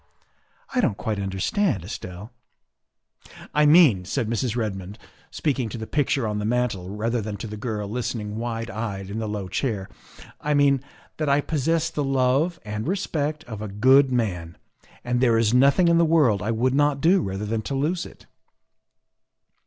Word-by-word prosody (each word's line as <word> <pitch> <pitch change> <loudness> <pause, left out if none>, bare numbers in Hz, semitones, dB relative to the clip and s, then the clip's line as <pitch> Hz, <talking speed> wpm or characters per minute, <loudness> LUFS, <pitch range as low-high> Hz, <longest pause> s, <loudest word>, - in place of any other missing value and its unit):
" - - -37
I 255 - +2
don't 105 - 0
quite 110 -3 -3
understand, 100 - 0
Estelle." 95 +2 -8 0.6
" - - -19
I 150 0 +4
mean," 145 - +6
said 115 +5 -2
Mrs. 115 +1 -1
Redmond, 100 -3 -4 0.3
speaking 135 -6 -1
to 120 - -6
the 110 - -5
picture 135 -2 0
on 105 0 -2
the - - -3
mantel 110 -5 -1
rather 115 +4 -1
than 105 -1 -5
to 105 - -6
the 105 -1 -6
girl 105 -1 -4
listening 110 -2 -4
wide 115 -1 -4
eyed 100 -2 -5
in 110 - -3
the 110 -1 -3
low 105 -2 -4
chair, 100 -1 -2 0.3
" - - -17
I 150 0 0
mean 140 -2 +4 0.4
that 155 -2 -1
I 140 +1 +4
possess 160 +2 0
the 150 - -2
love 135 +5 +1
and 105 +3 -4
respect 155 -5 -2
of 110 -3 -8
a 110 - -4
good 130 +7 +4
man, 90 -9 -2 0.5
and 120 0 0
there 120 -3 +4
is 115 0 +2
nothing 140 +7 +5
in 170 0 +4
the - - +5
world 150 - +3
I 105 - -2
would 120 +3 +1
not 145 0 +2
do 180 +5 +4
rather 95 -3 -3
than 110 +1 -1
to 135 - -4
lose 160 +6 0
it." - - -13
120 Hz, 185 wpm, -24 LUFS, 105-145 Hz, 0.6 s, mean